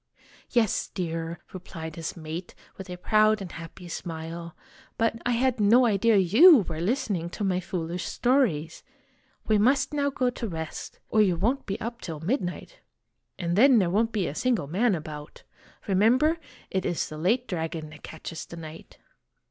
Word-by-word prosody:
"Yes, 225 Hz, -4 st, +1 dB
dear," 165 Hz, -1 st, -4 dB, 0.2 s
replied 160 Hz, -3 st, -7 dB
his 165 Hz, +1 st, -5 dB
mate, 160 Hz, +2 st, -6 dB, 0.2 s
with 190 Hz, -1 st, -9 dB
a 180 Hz, -, -6 dB
proud 215 Hz, +3 st, +3 dB
and 190 Hz, -3 st, -7 dB
happy 165 Hz, +2 st, -9 dB
smile; 170 Hz, 0 st, -6 dB, 0.4 s
"but 230 Hz, 0 st, 0 dB
I 245 Hz, -, +2 dB
had 250 Hz, 0 st, +1 dB
no 230 Hz, +5 st, +5 dB
idea 220 Hz, 0 st, +3 dB
you 230 Hz, -, +8 dB
were 160 Hz, -1 st, -4 dB
listening 195 Hz, -, -1 dB
to 205 Hz, -, -5 dB
my 185 Hz, -2 st, +1 dB
foolish 180 Hz, -1 st, -4 dB
stories. 215 Hz, -, +1 dB, 0.6 s
We 215 Hz, -1 st, +3 dB
must 265 Hz, +7 st, +3 dB
now 285 Hz, -1 st, +1 dB
go 255 Hz, -2 st, 0 dB
to 240 Hz, -1 st, -5 dB
rest, 160 Hz, -4 st, -6 dB
or 215 Hz, -, +5 dB
you 190 Hz, -4 st, +3 dB
won't 235 Hz, +11 st, 0 dB
be 195 Hz, -, -3 dB
up 235 Hz, +1 st, -5 dB
till 160 Hz, -4 st, -6 dB
midnight 180 Hz, -, -3 dB, 0.6 s
and 170 Hz, 0 st, -1 dB
then 255 Hz, +4 st, +6 dB
there 185 Hz, -5 st, +2 dB
won't 225 Hz, +4 st, +2 dB
be 205 Hz, -5 st, 0 dB
a -, -, -4 dB
single 240 Hz, -, 0 dB
man 195 Hz, -, +1 dB
about. 150 Hz, -2 st, -8 dB, 0.4 s
Remember, 245 Hz, -, +3 dB, 0.2 s
' -, -, -25 dB
It 190 Hz, -1 st, 0 dB
is 175 Hz, -, -1 dB
the 155 Hz, -, -8 dB
late 230 Hz, +9 st, +1 dB
dragon 160 Hz, -3 st, -4 dB
that 150 Hz, -, -13 dB
catches 160 Hz, +1 st, -8 dB
the 170 Hz, -, -9 dB
knight.' 160 Hz, 0 st, -10 dB
185 Hz, 170 wpm, -27 LUFS, 165-230 Hz, 0.6 s, you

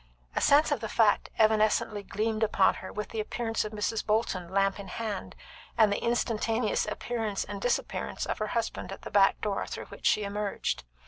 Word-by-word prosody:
A -, -, +1 dB
sense 290 Hz, +2 st, +5 dB
of -, -, +1 dB
the 220 Hz, 0 st, -4 dB
fact 215 Hz, -3 st, +3 dB
evanescently 215 Hz, -1 st, +3 dB
gleamed 215 Hz, +3 st, -2 dB
upon 210 Hz, -3 st, +4 dB
her 185 Hz, -, -7 dB
with 210 Hz, 0 st, -5 dB
the 225 Hz, -, -4 dB
appearance 225 Hz, +1 st, -1 dB
of 215 Hz, -, -5 dB
Mrs. 215 Hz, +1 st, -1 dB
Bolton, 210 Hz, -5 st, 0 dB
lamp 195 Hz, 0 st, +2 dB
in 200 Hz, -, -7 dB
hand, 210 Hz, -1 st, -4 dB, 0.4 s
and 215 Hz, -2 st, +5 dB
the -, -, -2 dB
instantaneous 230 Hz, -1 st, 0 dB
appearance 220 Hz, -4 st, -2 dB
and 200 Hz, 0 st, -7 dB
disappearance 245 Hz, -, -1 dB
of -, -, -3 dB
her 215 Hz, -, -1 dB
husband 205 Hz, -5 st, -3 dB
at 195 Hz, -, -8 dB
the -, -, -7 dB
back 195 Hz, -1 st, +4 dB
door 205 Hz, -2 st, -1 dB
through -, -, -6 dB
which -, -, -4 dB
she 210 Hz, -, +3 dB
emerged. 200 Hz, -, -2 dB
215 Hz, 190 wpm, -29 LUFS, 200-225 Hz, 0.4 s, sense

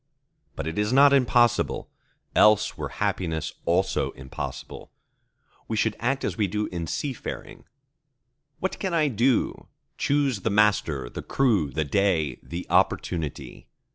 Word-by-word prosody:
But -, -, -4 dB
it 80 Hz, +4 st, -3 dB
is 105 Hz, +2 st, +1 dB
not 140 Hz, +2 st, +6 dB
impossible: 120 Hz, -3 st, +2 dB, 0.5 s
else 105 Hz, 0 st, +5 dB
were -, -, -5 dB
happiness 80 Hz, -3 st, -2 dB
also 90 Hz, +3 st, +1 dB
impossible. 65 Hz, 0 st, -7 dB, 0.8 s
We 110 Hz, -, -2 dB
should 110 Hz, 0 st, +1 dB
act 135 Hz, +3 st, -1 dB
as -, -, -2 dB
we 105 Hz, -3 st, +1 dB
do 105 Hz, +3 st, -2 dB
in 85 Hz, -2 st, -4 dB
seafaring. 135 Hz, -, -5 dB, 0.9 s
"What 190 Hz, -, -3 dB
can 190 Hz, -3 st, -1 dB
I 155 Hz, -3 st, +3 dB
do?"—Choose 130 Hz, +2 st, 0 dB
the 105 Hz, -, -1 dB
master, 100 Hz, -, +2 dB
the -, -, -7 dB
crew, 110 Hz, -, +1 dB
the 75 Hz, +3 st, -2 dB
day, 80 Hz, -4 st, +1 dB
the 85 Hz, +2 st, -6 dB
opportunity. 80 Hz, -5 st, -1 dB
105 Hz, 130 wpm, -25 LUFS, 85-125 Hz, 0.9 s, not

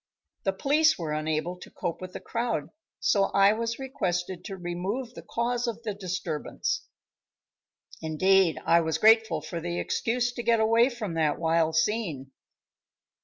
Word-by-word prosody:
The 195 Hz, -, +2 dB
police 305 Hz, +9 st, +3 dB
were 160 Hz, -3 st, -3 dB
unable 155 Hz, +3 st, -2 dB
to -, -, -11 dB
cope 175 Hz, -2 st, -4 dB
with 185 Hz, 0 st, -7 dB
the -, -, -5 dB
crowd, 235 Hz, +1 st, -2 dB, 0.3 s
so 200 Hz, -1 st, +3 dB
I 195 Hz, +1 st, +6 dB
was 230 Hz, +1 st, -2 dB
requested 185 Hz, -9 st, -3 dB
to 195 Hz, -, -6 dB
remove 190 Hz, +8 st, -4 dB
the -, -, -9 dB
cause 240 Hz, +1 st, -1 dB
of 230 Hz, 0 st, -4 dB
the 215 Hz, -3 st, -2 dB
disturbance. 185 Hz, -5 st, -3 dB, 1.1 s
Indeed 175 Hz, +3 st, +3 dB
I 170 Hz, 0 st, +5 dB
was 160 Hz, -1 st, -1 dB
grateful 220 Hz, -5 st, +5 dB
for 170 Hz, +2 st, -5 dB
the 175 Hz, +1 st, -3 dB
excuse 240 Hz, +1 st, 0 dB
to 240 Hz, -, -4 dB
get 230 Hz, -1 st, +3 dB
away 230 Hz, +3 st, +4 dB
from 225 Hz, -8 st, -5 dB
that 155 Hz, -3 st, +1 dB
wild 165 Hz, -1 st, +1 dB
scene. 160 Hz, -, 0 dB
190 Hz, 155 wpm, -27 LUFS, 165-230 Hz, 1.1 s, I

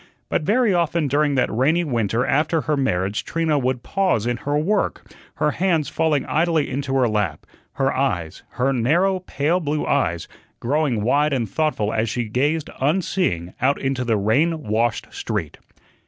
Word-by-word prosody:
But -, -, 0 dB
very 215 Hz, +5 st, +2 dB
often 170 Hz, -2 st, +1 dB
during 145 Hz, +1 st, +1 dB
that 125 Hz, -, +1 dB
rainy 155 Hz, +8 st, +2 dB
winter 120 Hz, -, 0 dB
after 155 Hz, +4 st, +1 dB
her 150 Hz, 0 st, 0 dB
marriage 100 Hz, -6 st, -1 dB
Trina 160 Hz, +1 st, 0 dB
would 130 Hz, -1 st, -1 dB
pause 185 Hz, -, 0 dB
in 120 Hz, 0 st, 0 dB
her 145 Hz, +4 st, -1 dB
work, 195 Hz, +7 st, -1 dB, 0.2 s
her 150 Hz, -, +1 dB
hands 165 Hz, -4 st, 0 dB
falling 150 Hz, -2 st, +1 dB
idly 160 Hz, -1 st, +1 dB
into 135 Hz, 0 st, -2 dB
her 130 Hz, -2 st, +3 dB
lap, 105 Hz, -8 st, -2 dB, 0.3 s
her 135 Hz, 0 st, 0 dB
eyes 90 Hz, -12 st, -1 dB
her 130 Hz, +2 st, +1 dB
narrow, 170 Hz, +11 st, +2 dB
pale 170 Hz, -1 st, 0 dB
blue 150 Hz, -2 st, -2 dB
eyes 85 Hz, -12 st, 0 dB, 0.3 s
growing 135 Hz, -4 st, 0 dB
wide 145 Hz, +5 st, +2 dB
and 120 Hz, -4 st, 0 dB
thoughtful 130 Hz, -9 st, -1 dB
as 110 Hz, 0 st, 0 dB
she 120 Hz, +2 st, -1 dB
gazed, 145 Hz, +8 st, -1 dB
unseeing, 145 Hz, -, 0 dB
out 135 Hz, +3 st, +2 dB
into 135 Hz, -1 st, -1 dB
the 115 Hz, -3 st, +1 dB
rain 150 Hz, +11 st, +1 dB
washed 115 Hz, +1 st, 0 dB
street. -, -, -4 dB
140 Hz, 165 wpm, -22 LUFS, 120-160 Hz, 0.3 s, her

